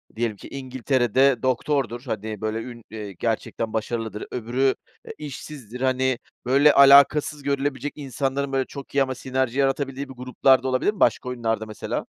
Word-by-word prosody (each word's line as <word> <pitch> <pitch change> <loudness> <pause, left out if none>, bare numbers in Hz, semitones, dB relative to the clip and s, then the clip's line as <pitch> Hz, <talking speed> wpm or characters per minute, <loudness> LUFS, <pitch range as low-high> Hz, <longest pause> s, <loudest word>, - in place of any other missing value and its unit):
diyelim 115 -2 -1
ki - - -11
İngiltere'de 130 -1 +1
doktordur. 130 -1 0
Hani, 110 -4 -5
böyle 110 0 -2
ün 120 -1 -9
eee, 105 -3 -7
gerçekten 110 +2 -3
başarılıdır. 110 -1 -3
Öbürü, 125 +3 0 0.3
e, - - -7
işsizdir. 135 -4 -8
Hani, 130 -1 +1 0.3
böyle, 140 +4 +5
alakasız 140 +1 +6
görülebilecek 140 0 -1
insanların, 135 0 -2
böyle, 135 -1 +1
çok 140 0 -10
iyi 140 - +5
ama 130 -1 -4
sinerji 130 0 -2
yaratabildiği 135 0 -1
bir - - -8
gruplar 130 +1 +2
da 130 - -2
olabilir 130 +11 +1
mi 210 - -13
başka 125 - +2
oyunlarda 115 -3 -2
mesela? 110 -1 -4
130 Hz, 160 wpm, -24 LUFS, 115-140 Hz, 0.3 s, alakasız